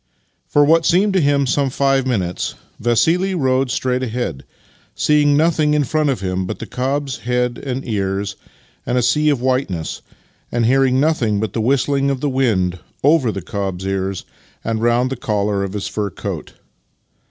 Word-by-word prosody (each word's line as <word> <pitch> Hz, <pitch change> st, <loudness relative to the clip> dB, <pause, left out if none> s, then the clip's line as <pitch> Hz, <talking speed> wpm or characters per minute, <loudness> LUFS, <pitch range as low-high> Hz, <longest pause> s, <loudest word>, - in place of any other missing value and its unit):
For 145 Hz, -, +4 dB
what 165 Hz, +2 st, +4 dB
seemed 190 Hz, +5 st, +3 dB
to 190 Hz, -, +3 dB
him 140 Hz, -1 st, +2 dB
some 135 Hz, +1 st, +1 dB
five 135 Hz, 0 st, +1 dB
minutes 95 Hz, -8 st, -2 dB, 0.2 s
Vassili 165 Hz, -, +2 dB
rode 130 Hz, -4 st, +1 dB
straight 125 Hz, +3 st, 0 dB
ahead, 120 Hz, -, -3 dB, 0.5 s
seeing 145 Hz, -1 st, +3 dB
nothing 155 Hz, -1 st, +2 dB
in 150 Hz, -, +3 dB
front 155 Hz, +2 st, 0 dB
of 130 Hz, -, -1 dB
him 95 Hz, -1 st, -2 dB
but -, -, -4 dB
the -, -, -6 dB
cob's 135 Hz, +1 st, -2 dB
head 125 Hz, 0 st, -1 dB
and 130 Hz, -1 st, -4 dB
ears 100 Hz, -2 st, -2 dB, 0.5 s
and 125 Hz, -, -1 dB
a 125 Hz, -, +2 dB
sea 150 Hz, +6 st, +3 dB
of 140 Hz, -5 st, +1 dB
whiteness, 125 Hz, -11 st, -1 dB, 0.5 s
and 120 Hz, -1 st, +1 dB
hearing 130 Hz, +1 st, +3 dB
nothing 130 Hz, -9 st, +1 dB
but 105 Hz, -2 st, -2 dB
the 115 Hz, -, -1 dB
vv^histling 140 Hz, +3 st, +1 dB
of 135 Hz, -2 st, -1 dB
the 145 Hz, -, -1 dB
wind 100 Hz, -10 st, +1 dB, 0.2 s
over 140 Hz, -5 st, +4 dB
the 100 Hz, -4 st, -6 dB
cob's 95 Hz, -4 st, -4 dB
ears 95 Hz, -1 st, -2 dB, 0.4 s
and 110 Hz, -1 st, -2 dB
round 120 Hz, +2 st, +2 dB
the -, -, -1 dB
collar 105 Hz, -3 st, -1 dB
of 100 Hz, -1 st, -4 dB
his 105 Hz, -1 st, -3 dB
fur 105 Hz, -1 st, -2 dB
coat. -, -, -6 dB
125 Hz, 175 wpm, -19 LUFS, 105-140 Hz, 0.5 s, For